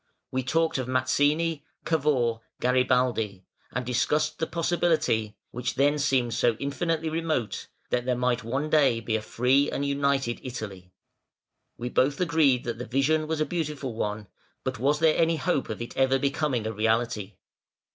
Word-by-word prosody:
We 130 - 0
talked 160 +3 +1
of 130 - -3
Mazzini, 145 +5 +1 0.2
Cavour, 135 -8 +1 0.2
Garibaldi, 125 -6 +1 0.3
and 125 0 -3
discussed 150 +5 0
the 160 - 0
possibility 160 -11 0
which 125 +1 -3
then 145 +3 +3
seemed 130 -5 +1
so 120 +1 +2
infinitely 160 +4 -1
remote 155 -7 -2 0.2
that 120 0 0
there 125 -1 +1
might 125 0 0
one 135 +6 -2
day 140 -7 +4
be 115 -1 -2
a 110 - 0
free 130 +6 +2
and 140 - -2
united 140 -3 0
Italy. 100 -8 -7 0.9
We 120 +1 -4
both 140 +3 +2
agreed 160 -8 +3
that 120 -1 -4
the 125 - -4
vision 155 +4 +1
was 160 0 -1
a - - +3
beautiful 150 -7 -3
one, 105 -1 -3 0.4
but 130 0 -3
was 140 +4 +2
there 160 0 +4
any 165 0 +3
hope 160 -3 -1
of 110 - -4
it 120 - -9
ever 135 0 +3
becoming 140 -3 0
a 110 - -2
reality? 110 -2 0
130 Hz, 160 wpm, -27 LUFS, 120-150 Hz, 0.9 s, day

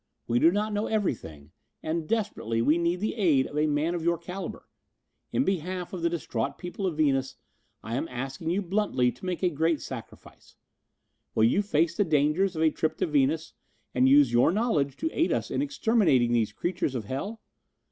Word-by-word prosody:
We 120 +1 +2
do 165 - +6
not 210 +2 -1
know 205 +1 -1
everything 80 - -3 0.3
and, 160 0 -2
desperately, 205 - -1
we 150 +8 +3
need 170 +2 0
the 215 - -1
aid 160 - +3
of - - -8
a 150 +1 +2
man 150 +3 0
of 170 -2 -3
your 170 0 +2
caliber. 180 +4 -7 0.6
In 260 - +2
behalf 180 - -2
of 180 - -4
the 170 - +2
distraught 125 -9 -3
people 185 +2 -4
of 165 -4 -3
Venus, 135 -4 +1 0.5
I 115 - -5
am 140 - -2
asking 135 +5 -5
you 190 +4 0
bluntly 175 -10 +1
to 125 +9 -12
make 180 +1 -3
a 180 - +4
great 160 +1 +1
sacrifice. 125 -4 -10 0.8
Will 110 - +3
you 120 - +4
face 170 -4 +1
the 205 - +3
dangers 160 +3 +2
of 160 - 0
a 160 - +4
trip 155 +1 -1
to - - +1
Venus 150 +2 +1 0.4
and 130 +1 +4
use 140 -3 +5
your 120 +6 +5
knowledge 165 - 0
to 320 - -2
aid 335 - +1
us - - -1
in - - 0
exterminating 220 - +2
these 115 -3 +1
creatures 170 - -2
of 115 -4 -3
hell?" 195 - -4
160 Hz, 195 wpm, -27 LUFS, 135-185 Hz, 0.8 s, do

